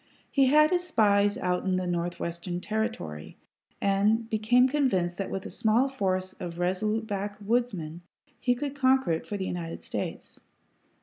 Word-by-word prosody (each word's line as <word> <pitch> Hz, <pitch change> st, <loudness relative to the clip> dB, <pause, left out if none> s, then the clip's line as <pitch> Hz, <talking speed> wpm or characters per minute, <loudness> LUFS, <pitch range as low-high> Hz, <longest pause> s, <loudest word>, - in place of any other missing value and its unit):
He 275 Hz, -2 st, +4 dB
had 305 Hz, +4 st, +5 dB
his 355 Hz, -1 st, +2 dB
spies 205 Hz, -, +3 dB
out 180 Hz, -7 st, -1 dB
in 190 Hz, -1 st, +1 dB
the 185 Hz, 0 st, -1 dB
Northwestern 175 Hz, 0 st, -3 dB
Territory, 210 Hz, -, -4 dB, 0.4 s
and 210 Hz, +3 st, +2 dB
became 235 Hz, +4 st, +4 dB
convinced 205 Hz, -11 st, 0 dB
that 195 Hz, -, -2 dB
with 195 Hz, -, -4 dB
a -, -, -6 dB
small 230 Hz, +5 st, +2 dB
force 185 Hz, -7 st, -1 dB
of 170 Hz, -1 st, -5 dB
resolute 210 Hz, +5 st, 0 dB
backwoodsmen 205 Hz, -4 st, -2 dB, 0.4 s
he 245 Hz, -1 st, +2 dB
could 280 Hz, +2 st, -4 dB
conquer 265 Hz, -6 st, +3 dB
it 160 Hz, -, -2 dB
for 205 Hz, -, -3 dB
the 190 Hz, -, -3 dB
United 170 Hz, -2 st, -5 dB
States. -, -, -5 dB
205 Hz, 150 wpm, -28 LUFS, 180-245 Hz, 0.4 s, had